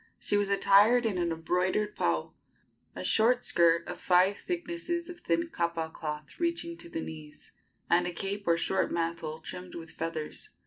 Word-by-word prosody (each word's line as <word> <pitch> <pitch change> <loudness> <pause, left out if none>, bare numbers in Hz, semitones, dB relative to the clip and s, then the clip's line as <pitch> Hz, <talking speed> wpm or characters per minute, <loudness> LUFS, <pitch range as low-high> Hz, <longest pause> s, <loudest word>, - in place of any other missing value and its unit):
She - - 0
was 205 -1 +2
attired 205 +5 +5
in 200 -5 0
an 170 -1 0
embroidered 180 +5 0
pau 80 -2 0 0.6
a 90 - -5
short 240 - +3
skirt 170 -1 +3
of - - -6
five 185 +2 +4
thicknesses 345 - -3
of 350 0 -8
thin 335 -1 0
kapa 170 - -2
cloth 150 -2 -6
reaching 335 0 -1
to 340 - -8
the 330 -1 -4
knees 155 - -9 0.4
and 175 +1 +3
a - - -2
cape 195 +3 -4
or 170 0 +4
short 190 +3 0
mantle 165 -2 -2
trimmed 180 +2 -8
with 165 -1 -7
feathers. 160 -2 -5
180 Hz, 170 wpm, -30 LUFS, 165-235 Hz, 0.6 s, attired